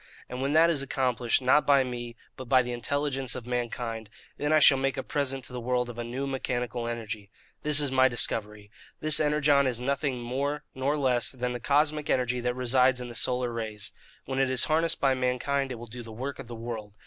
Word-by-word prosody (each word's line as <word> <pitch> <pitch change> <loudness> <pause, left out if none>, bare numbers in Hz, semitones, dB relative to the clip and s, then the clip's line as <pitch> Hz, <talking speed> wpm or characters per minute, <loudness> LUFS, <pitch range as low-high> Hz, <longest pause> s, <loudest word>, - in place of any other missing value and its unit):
And 125 +1 -6
when 140 +2 0
that 165 +2 +6
is 145 -4 0
accomplished, 130 -3 0
not 130 +4 +5
by 140 -2 +5
me 120 -2 -6 0.2
but 130 -2 -9
by 130 -1 +5
the 125 - -5
intelligence 135 +1 -1
of 125 -3 -6
mankind, 120 -2 -3 0.3
then 145 +1 -2
I 155 - +6
shall 140 -3 +7
make 135 0 -1
a 130 - -2
present 135 -2 -2
to 125 - -8
the 125 - -4
world 125 0 -1
of 120 - -10
a - - -2
new 125 +4 -4
mechanical 125 -3 -3
energy. 110 -3 -5 0.3
This 150 -1 +4
is 145 -3 0
my 130 0 +5
discovery. 105 -3 0 0.3
This 155 0 +3
Energon 150 -2 +3
is 120 -2 -1
nothing 140 0 -1
more 140 +5 -2
nor 135 +3 -1
less 130 -4 +1
than 125 -1 -3
the 120 - -4
cosmic 150 +4 +1
energy 125 -1 +1
that 125 0 -1
resides 125 0 +3
in 125 -1 -6
the 120 - -9
solar 125 +1 +1
rays. 110 -3 -4 0.3
When 135 0 -3
it 135 -1 +2
is 130 -2 +2
harnessed 165 +1 +1
by 135 -1 +3
mankind 130 +2 -1
it - - -3
will 120 +1 -9
do 120 +1 -9
the 115 -1 -10
work 130 +5 -5
of - - -8
the 120 - -7
world. 115 -3 -6
125 Hz, 220 wpm, -28 LUFS, 120-140 Hz, 0.3 s, shall